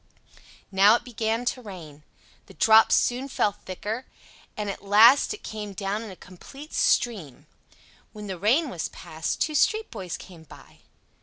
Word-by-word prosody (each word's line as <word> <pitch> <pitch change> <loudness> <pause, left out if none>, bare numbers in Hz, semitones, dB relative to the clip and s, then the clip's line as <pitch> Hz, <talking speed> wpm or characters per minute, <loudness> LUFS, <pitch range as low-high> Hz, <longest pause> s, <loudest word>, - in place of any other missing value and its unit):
Now 200 +3 +6
it - - -3
began 230 0 -2
to 250 - -2
rain; 170 -9 -11 0.5
the - - -16
drops 220 +6 +5
soon 250 +3 0
fell 210 - +1
thicker, 205 +4 -7 0.5
and 210 -1 -3
at 200 - -6
last 215 +7 +6
it 420 - -7
came 210 -2 -7
down 200 +2 -3
in 225 - -8
a 190 - -10
complete 270 - -13
stream. 195 - 0 0.7
When 210 -1 -9
the 190 -3 -6
rain 255 - +2
was 170 - -4
past, 160 +1 -5
two 310 - 0
street 435 +9 +1
boys 185 -6 -6
came 175 -4 -13
by. 160 - -17
210 Hz, 160 wpm, -25 LUFS, 190-240 Hz, 0.7 s, Now